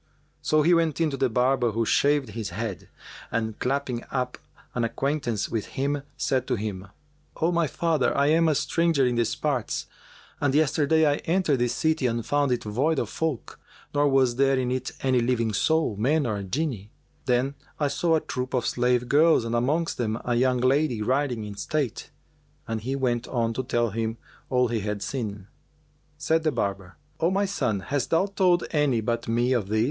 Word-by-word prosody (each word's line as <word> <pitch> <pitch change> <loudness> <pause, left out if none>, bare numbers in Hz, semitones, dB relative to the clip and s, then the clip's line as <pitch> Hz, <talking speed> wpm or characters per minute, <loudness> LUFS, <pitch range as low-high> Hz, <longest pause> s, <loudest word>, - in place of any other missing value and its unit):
So 155 0 +2
he 175 +3 +4
went 165 -3 +2
in 160 -2 +2
to - - -2
the 135 -1 +1
barber 125 0 +2
who 115 +1 0
shaved 145 +1 +2
his 110 -1 -5
head; 100 0 -5 0.4
and, 110 -1 -2
clapping 130 -2 -1
up 125 -2 -3 0.3
an 120 - -1
acquaintance 120 -2 -1
with 110 -3 -3
him, 140 +1 0 0.2
said 130 -2 0
to 125 - +1
him, 100 -3 -5 0.5
"O 165 +2 +1
my 170 -2 +2
father, 160 -1 0
I 140 - +3
am 165 +1 +4
a 155 - +3
stranger 160 -1 +2
in 125 - +1
these 120 -1 0
parts 140 -7 -2 0.5
and 145 -1 +1
yesterday 155 +1 +3
I 145 -1 +2
entered 165 -6 +1
this 120 -1 0
city 160 -4 +1
and 115 -1 -2
found 145 -1 +1
it 125 - 0
void 135 +10 0
of - - -1
folk, 160 -7 -3 0.3
nor 145 0 +3
was 130 -3 +3
there 135 0 +3
in 125 -1 0
it 130 0 -2
any 130 -2 +3
living 115 -2 0
soul, 160 0 +1
man 140 +9 +1
nor 105 -5 -2
Jinni. 105 - -3 0.4
Then 125 +2 +1 0.3
I 145 - +2
saw 160 +4 +1
a 160 - +1
troop 130 +1 -4
of 125 - 0
slave 125 0 +1
girls 150 -3 +4
and 115 - -3
amongst 145 +8 0
them 110 -1 -1
a 120 - 0
young 125 +1 +2
lady 130 -3 +2
riding 130 -2 0
in 105 -1 -6
state:" 145 -3 -2 0.6
and 115 -1 -3
he 130 +5 -2
went 125 -3 -1
on 115 -3 -1
to 130 - -2
tell 120 -3 0
him 115 +1 -2 0.3
all 125 -1 +3
he 115 -1 0
had 105 0 -3
seen. 105 -7 -4 0.7
Said 160 +2 +1
the 155 -1 +1
barber, 100 -6 -3 0.2
"O 165 - +2
my 195 +2 +1
son, 125 - -1
hast 140 +3 -2
thou 165 +4 +3
told 185 -3 +2
any 145 -6 +2
but 115 +1 -2
me 120 +3 +2
of 115 -6 0
this?" 110 +2 0
130 Hz, 195 wpm, -26 LUFS, 115-150 Hz, 0.7 s, he